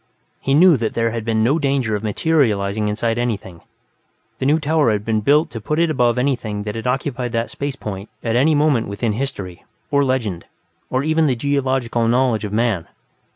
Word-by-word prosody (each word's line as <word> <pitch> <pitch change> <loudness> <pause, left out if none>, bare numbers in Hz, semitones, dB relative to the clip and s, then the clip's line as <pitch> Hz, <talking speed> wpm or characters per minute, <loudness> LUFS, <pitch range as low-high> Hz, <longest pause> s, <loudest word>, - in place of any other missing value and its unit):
He 135 - +1
knew 170 0 +6
that 115 -2 -3
there 115 0 +1
had 115 -1 -4
been 110 -1 +1
no 140 +8 +2
danger 135 -6 0
of 105 - -3
materializing 105 -4 +1
inside 115 +2 -1
anything; 100 -8 -3 0.8
the 130 - 0
New 155 +3 +3
Tower 155 -4 +2
had 105 -1 -2
been 110 -1 0
built 150 +8 +3
to 115 - -6
put 150 +9 -2
it 165 -1 +2
above 125 -4 +2
anything 120 -6 -1
that 105 0 -4
had 115 +2 -5
occupied 125 -1 -2
that 115 0 -1
space 140 -1 -4
point 100 -4 -7
at 115 -1 0
any 150 +5 +4
moment 145 -6 +2
within 105 +2 -2
history, 105 -8 -5 0.3
or 140 -1 +3
legend, 120 -10 -1 0.4
or 130 +1 0
even 155 +1 +2
the 130 - +1
geological 130 -3 0
knowledge 120 -3 +2
of 100 - -5
man. 110 -5 0
120 Hz, 195 wpm, -20 LUFS, 110-140 Hz, 0.8 s, knew